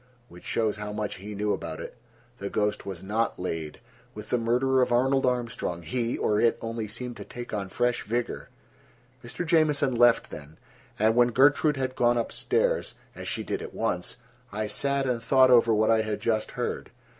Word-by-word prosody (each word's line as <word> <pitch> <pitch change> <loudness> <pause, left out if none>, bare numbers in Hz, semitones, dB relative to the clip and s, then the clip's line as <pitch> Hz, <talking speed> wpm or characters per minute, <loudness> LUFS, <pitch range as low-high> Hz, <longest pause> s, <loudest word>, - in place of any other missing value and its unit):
Which 90 - -14
shows 110 -2 0
how 105 0 -5
much 105 0 -4
he 105 +2 -8
knew 105 +1 0
about 80 -1 -5
it. - - -8 0.4
The 100 - -4
ghost 105 -1 -1
was 95 -3 -6
not 110 +4 -1
laid: 80 -4 -4 0.4
with 105 0 -9
the 125 - +2
murder 125 +3 +2
of 125 - +1
Arnold 130 +2 +3
Armstrong 120 -8 -2
he, 120 +5 -2
or 105 0 +1
it, 115 - +3
only 115 -1 -4
seemed 120 +3 -6
to - - -7
take 120 -1 -9
on 100 -2 -3
fresh 120 +4 0
vigor. 120 +3 -3 0.7
Mr. 120 +9 -5
Jamieson 150 -5 +3
left 120 0 +4
then, 75 +1 -10 0.4
and 110 +2 +3
when 120 0 +5
Gertrude 145 +4 +3
had 130 -1 -2
gone 120 0 +3
up 115 - -1
stairs, - - 0 0.2
as - - -8
she - - -1
did - - -3
at - - -8
once, 90 +5 -2 0.3
I 105 +1 -2
sat 140 +5 0
and 125 -3 -1
thought 130 +2 +5
over 115 -2 +6
what 110 0 +3
I 110 -1 +4
had 110 -1 -3
just 110 0 -1
heard. - - -3
115 Hz, 190 wpm, -27 LUFS, 105-125 Hz, 0.7 s, over